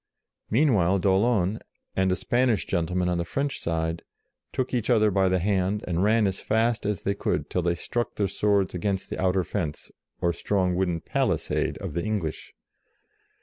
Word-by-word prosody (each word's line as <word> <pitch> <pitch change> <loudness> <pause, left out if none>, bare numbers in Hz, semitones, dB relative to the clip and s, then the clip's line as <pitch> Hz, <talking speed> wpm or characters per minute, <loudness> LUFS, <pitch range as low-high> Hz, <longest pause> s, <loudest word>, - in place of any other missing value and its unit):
Meanwhile 105 - +3
d'Aulon, 100 +1 +2 0.4
and 95 0 +2
a - - +2
Spanish 120 0 +1
gentle 85 +1 -1
man 90 -1 +1
on 90 -1 0
the - - 0
French 140 +11 -2
side, 80 0 -2 0.5
took 130 0 -2
each 120 -2 -1
other 110 -3 +4
by 95 -1 +3
the 95 - +2
hand, 95 +2 0
and 90 +1 0
ran 110 +1 +4
as 95 -1 -1
fast 110 -1 +1
as 105 -3 -2
they 100 - +1
could 100 - -2
till 90 - +1
they 85 0 +1
struck 120 +6 -3
their 100 - +1
swords 100 0 +1
against 95 +1 -2
the - - -3
outer 95 0 +2
fence, 80 -6 -4 0.3
or 85 0 +1
strong 95 0 0
wooden 90 -3 0
palisade - - 0
of - - -6
the 85 - -2
English. 100 -8 -3
95 Hz, 180 wpm, -26 LUFS, 90-105 Hz, 0.5 s, other